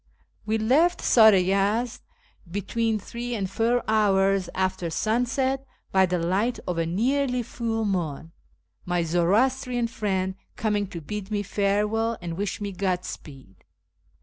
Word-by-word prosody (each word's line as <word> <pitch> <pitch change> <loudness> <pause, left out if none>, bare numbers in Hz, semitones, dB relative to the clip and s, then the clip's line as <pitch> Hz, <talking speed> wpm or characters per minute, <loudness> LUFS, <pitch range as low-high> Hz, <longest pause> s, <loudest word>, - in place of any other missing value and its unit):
We 220 +1 +1
left 290 +11 +3
Sar 220 -2 +7
i 190 -3 +4
Yezd 200 +6 0 0.5
between 220 +4 -1
three 240 +4 -5
and 195 -3 -2
four 230 +5 +1
hours 195 -3 +2
after 185 -2 -1
sunset 250 +8 0 0.3
by 190 -1 +4
the 180 0 0
light 190 +8 0
of 175 -2 -1
a 165 - 0
nearly 250 +7 +1
full 225 -1 -2
moon, 165 -5 -2 0.5
my 175 -1 0
Zoroastrian 235 +9 +1
friend 190 -5 -1 0.2
coming 210 -2 0
to 175 -4 -7
bid 205 +5 -6
me 205 -1 -1
farewell 210 +3 0
and 170 -2 -5
wish 200 +2 -3
me 205 -1 -4
Godspeed. 175 - -5
205 Hz, 135 wpm, -25 LUFS, 185-230 Hz, 0.5 s, Sar